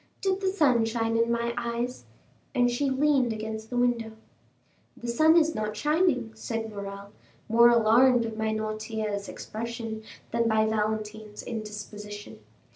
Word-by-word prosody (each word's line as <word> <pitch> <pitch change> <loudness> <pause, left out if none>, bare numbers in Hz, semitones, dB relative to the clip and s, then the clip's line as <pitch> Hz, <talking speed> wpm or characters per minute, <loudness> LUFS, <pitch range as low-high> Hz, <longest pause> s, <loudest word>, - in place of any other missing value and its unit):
Did 385 0 0
the 385 - 0
sun 285 - +3
shine 225 0 -1
in 230 +1 +2
my 235 0 0
eyes?" 240 +1 -3 0.5
And 245 -1 +3
she 275 +3 0
leaned 265 -2 +2
against 220 0 -5
the 245 - -3
window. 240 -2 +1 0.8
"The 240 - -7
sun 315 +8 +5
is 320 -1 +4
not 215 -3 -3
shining," 295 -4 +1
said 225 0 -4
Morrel, 200 0 -7 0.4
more 235 +1 +6
alarmed 235 0 +4
by 220 0 -1
Noirtier's 215 -1 -3
expression 225 0 -5 0.3
than 235 0 +1
by 220 -1 +3
Valentine's 215 -1 -2
indisposition. 210 -2 -7
225 Hz, 135 wpm, -27 LUFS, 215-245 Hz, 0.8 s, more